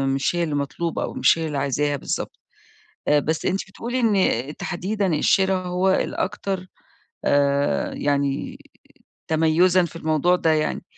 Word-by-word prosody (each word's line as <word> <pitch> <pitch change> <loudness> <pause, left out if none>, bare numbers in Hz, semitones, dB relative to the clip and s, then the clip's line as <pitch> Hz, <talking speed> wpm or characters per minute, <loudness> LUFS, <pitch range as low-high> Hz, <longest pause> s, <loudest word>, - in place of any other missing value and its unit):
مش 135 +5 0
هي 175 - +1
اللي 155 -3 -2
مطلوبة 145 +4 -2
أو - - -4
مش - - +3
هي 160 - -2
اللي 150 -2 -3
عايزاها 145 +1 0
بالضبط. - - -4 0.7
آآ 150 0 +5
بس 155 +2 -2
أنتِ 190 +1 +1
بتقولي 240 +6 -4
إن 190 - +1
تحديدًا 195 +3 -2
الشرا 190 +5 +3
هو 180 +1 0
الأكتر 190 -1 -2 0.6
آآ، 140 0 +1
يعني 140 -1 -1 0.7
تميُزًا 165 +3 +3
في 165 - -8
الموضوع 160 +2 +2
ده 165 - +1
يعني. 155 -1 0
165 Hz, 140 wpm, -23 LUFS, 145-185 Hz, 0.7 s, آآ